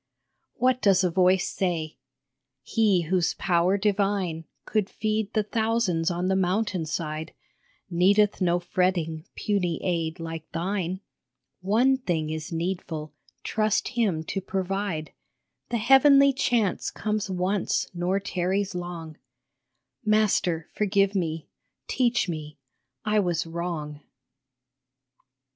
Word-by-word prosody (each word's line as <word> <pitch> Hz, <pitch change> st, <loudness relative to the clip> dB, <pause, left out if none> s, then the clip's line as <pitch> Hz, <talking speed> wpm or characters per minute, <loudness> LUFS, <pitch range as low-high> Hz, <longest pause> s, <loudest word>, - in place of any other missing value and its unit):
What 255 Hz, 0 st, +2 dB
does 195 Hz, -2 st, +4 dB
a 180 Hz, -, +2 dB
voice 185 Hz, +1 st, +3 dB
say? 165 Hz, -4 st, -2 dB, 0.4 s
" 130 Hz, -, -58 dB, 0.2 s
He 205 Hz, -, +2 dB
whose 175 Hz, +1 st, +1 dB
power 180 Hz, +1 st, +2 dB
divine 195 Hz, -5 st, 0 dB, 0.2 s
Could 210 Hz, -3 st, 0 dB
feed 215 Hz, -1 st, -1 dB
the 215 Hz, -, +2 dB
thousands 220 Hz, -6 st, 0 dB
on 175 Hz, +1 st, -1 dB
the 190 Hz, -, +2 dB
mountain 190 Hz, -2 st, 0 dB
side 155 Hz, -1 st, -4 dB, 0.5 s
Needeth 200 Hz, +4 st, +3 dB
no 175 Hz, -1 st, +3 dB
fretting, 175 Hz, -3 st, -1 dB
puny 180 Hz, -6 st, -1 dB
aid 165 Hz, -1 st, -1 dB
like 165 Hz, -1 st, -6 dB
thine. 185 Hz, +1 st, -2 dB, 0.6 s
One 230 Hz, +8 st, +3 dB
thing 165 Hz, -11 st, -2 dB
is 160 Hz, +2 st, -5 dB
needful, 165 Hz, -3 st, -3 dB, 0.3 s
trust 215 Hz, -1 st, 0 dB
him 210 Hz, -10 st, 0 dB
to 195 Hz, +4 st, -3 dB
provide; 190 Hz, -3 st, -3 dB, 0.6 s
The 240 Hz, -, 0 dB
Heavenly 275 Hz, +4 st, +6 dB
Chance 235 Hz, -6 st, +1 dB
comes 215 Hz, -1 st, -2 dB
once 185 Hz, +1 st, 0 dB
nor 180 Hz, +2 st, 0 dB
tarries 190 Hz, +1 st, -1 dB
long 175 Hz, -3 st, -6 dB, 0.4 s
" 130 Hz, 0 st, -55 dB
Master, 210 Hz, -6 st, +2 dB
forgive 200 Hz, -1 st, +2 dB
me, 165 Hz, -4 st, -2 dB, 0.4 s
teach 245 Hz, -4 st, +1 dB
me, 155 Hz, -3 st, -5 dB, 0.5 s
I 210 Hz, 0 st, +3 dB
was 175 Hz, -5 st, 0 dB
wrong 165 Hz, -3 st, -4 dB
185 Hz, 115 wpm, -26 LUFS, 165-210 Hz, 0.6 s, Heavenly